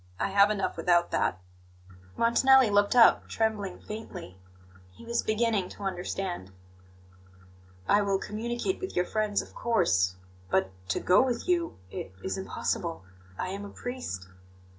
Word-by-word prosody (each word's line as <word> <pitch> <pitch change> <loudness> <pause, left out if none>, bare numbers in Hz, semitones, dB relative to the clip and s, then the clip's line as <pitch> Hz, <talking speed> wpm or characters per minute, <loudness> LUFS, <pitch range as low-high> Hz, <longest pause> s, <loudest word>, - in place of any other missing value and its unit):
I - - 0
have 200 +1 +5
enough 205 -2 -1
without 175 -1 +2
that." 95 - +1 0.8
Montanelli 255 +1 +5
looked 205 +2 +3
up, 235 -2 +6
trembling 215 -4 -1
faintly. 210 - -8 0.6
He - - -14
was 235 0 0
beginning 215 -3 0
to 205 - -10
understand. 180 - -3 1.4
"I 205 - +4
will 200 -1 +1
communicate 235 - -3
with 375 - -6
your 180 - +2
friends, 215 0 0
of - - -16
course. 95 - +1 0.3
But 95 0 +1 0.2
to - - +1
go 180 - +5
with 250 +1 -1
you 345 -2 0
it 95 - -6
is 95 - -2
impossible 95 -2 -3 0.3
I 185 - -3
am 200 +2 -5
a 205 - -7
priest." 200 - -6
205 Hz, 140 wpm, -28 LUFS, 180-230 Hz, 1.4 s, up